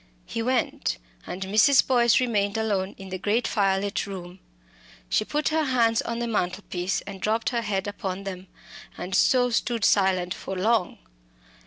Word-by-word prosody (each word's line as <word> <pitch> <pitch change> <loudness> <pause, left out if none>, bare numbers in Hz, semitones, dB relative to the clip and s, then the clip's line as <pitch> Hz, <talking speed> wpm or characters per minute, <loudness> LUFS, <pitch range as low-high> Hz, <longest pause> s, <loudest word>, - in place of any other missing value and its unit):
He 230 - -4
went, 250 +1 0 0.3
and 185 +2 -4
Mrs. 215 +8 +5
Boyce 240 -3 +4
remained 210 -4 0
alone 200 -3 -1
in 195 -1 -10
the 185 0 -5
great 215 +5 +1
fire 195 -2 +2
lit 200 0 -2
room. 185 -1 -8 0.7
She - - +2
put 295 +6 -1
her 315 0 +1
hands 235 -4 +2
on 235 - -4
the 240 - -2
mantelpiece, 185 -3 -2
and 195 -2 -9
dropped 220 +1 0
her 235 -2 0
head 195 -3 -2
upon 195 -2 -4
them, 190 -1 -7 0.5
and 180 +2 -6
so 245 +4 +4
stood 230 -1 0
silent 185 -3 +2
for 190 - -6
long. 210 0 +1
205 Hz, 165 wpm, -25 LUFS, 190-235 Hz, 0.7 s, Mrs